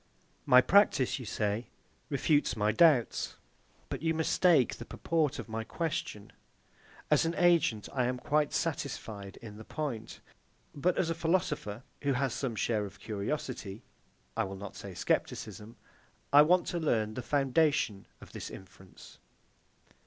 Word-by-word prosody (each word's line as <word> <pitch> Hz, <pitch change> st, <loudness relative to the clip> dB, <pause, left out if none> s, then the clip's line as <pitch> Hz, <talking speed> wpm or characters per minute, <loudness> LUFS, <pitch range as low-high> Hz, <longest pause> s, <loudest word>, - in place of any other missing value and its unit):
My 125 Hz, 0 st, +8 dB
practice, 180 Hz, -, +3 dB
you 125 Hz, -, -7 dB
say, 105 Hz, +2 st, -2 dB, 0.4 s
refutes 145 Hz, 0 st, +2 dB
my 105 Hz, 0 st, +2 dB
doubts. 135 Hz, -1 st, +3 dB, 0.5 s
But -, -, -5 dB
you 165 Hz, 0 st, +1 dB
mistake 160 Hz, -3 st, +3 dB
the -, -, -7 dB
purport 155 Hz, +3 st, -1 dB
of 115 Hz, -, -6 dB
my 110 Hz, 0 st, -4 dB
question. 130 Hz, -8 st, -4 dB, 0.8 s
As -, -, +5 dB
an 165 Hz, +1 st, -1 dB
agent, 165 Hz, -, +3 dB
I 125 Hz, -2 st, +1 dB
am 125 Hz, +1 st, -1 dB
quite 150 Hz, +3 st, +1 dB
satisfied 110 Hz, -, -4 dB
in 105 Hz, -2 st, -9 dB
the 110 Hz, -, -9 dB
point; 125 Hz, -5 st, -5 dB, 0.5 s
but 175 Hz, +5 st, 0 dB
as 165 Hz, -, +1 dB
a -, -, +2 dB
philosopher, 160 Hz, -, -1 dB, 0.2 s
who 140 Hz, -1 st, +1 dB
has 130 Hz, -1 st, 0 dB
some 130 Hz, -5 st, -3 dB
share 110 Hz, 0 st, 0 dB
of 100 Hz, +1 st, -15 dB
curiosity, 105 Hz, -1 st, -4 dB, 0.5 s
I 115 Hz, -, +1 dB
will 95 Hz, 0 st, -6 dB
not 100 Hz, 0 st, -8 dB
say -, -, -8 dB
scepticism, 105 Hz, +2 st, -2 dB, 0.6 s
I 145 Hz, -, +10 dB
want 175 Hz, +4 st, +4 dB
to 175 Hz, -, -2 dB
learn 110 Hz, -9 st, 0 dB
the 125 Hz, -, -4 dB
foundation 135 Hz, -5 st, +1 dB
of -, -, -13 dB
this -, -, -7 dB
inference. 95 Hz, 0 st, -14 dB
125 Hz, 145 wpm, -31 LUFS, 110-155 Hz, 0.8 s, I